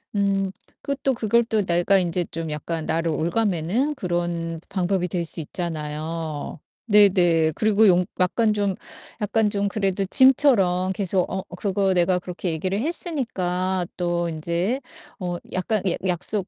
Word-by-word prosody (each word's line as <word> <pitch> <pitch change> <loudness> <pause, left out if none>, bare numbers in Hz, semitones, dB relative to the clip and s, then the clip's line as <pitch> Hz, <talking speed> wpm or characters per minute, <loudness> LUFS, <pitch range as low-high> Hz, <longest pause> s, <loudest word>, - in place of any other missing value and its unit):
음 195 -1 +1 0.3
그 280 - -2
또 270 - +3
그걸 235 +1 +2
또 220 -2 +1
내가 175 +2 +3
인제 175 0 0
좀 165 -1 -4
약간 160 +2 -3
나를 165 +1 0
옭아매는 195 - 0
그런 175 -4 -2
방법이 185 -1 0
될 175 -1 -1
수 165 - -2
있잖아요. 155 -1 -5 0.3
네네. 180 -6 +5
그리고 215 0 +4
용 180 -1 +4
약간 215 +5 +2
좀, 200 -2 0 0.5
약간 210 +1 +1
좀 200 -1 -1
그래도 195 -1 -1
짐처럼 195 -7 +4
계속 190 -2 0
어 190 0 -3
그거 195 0 +1
내가 180 +1 +3
그렇게 180 0 -5
얘기를 185 +5 -2
했으니까 190 - -2
또 175 -1 0
인제 170 - -1 0.4
어 180 -2 -3 0.2
약간 195 +2 0
약 - - -1
약속 180 +2 -1
185 Hz, 270 characters per minute, -23 LUFS, 170-205 Hz, 0.5 s, 네네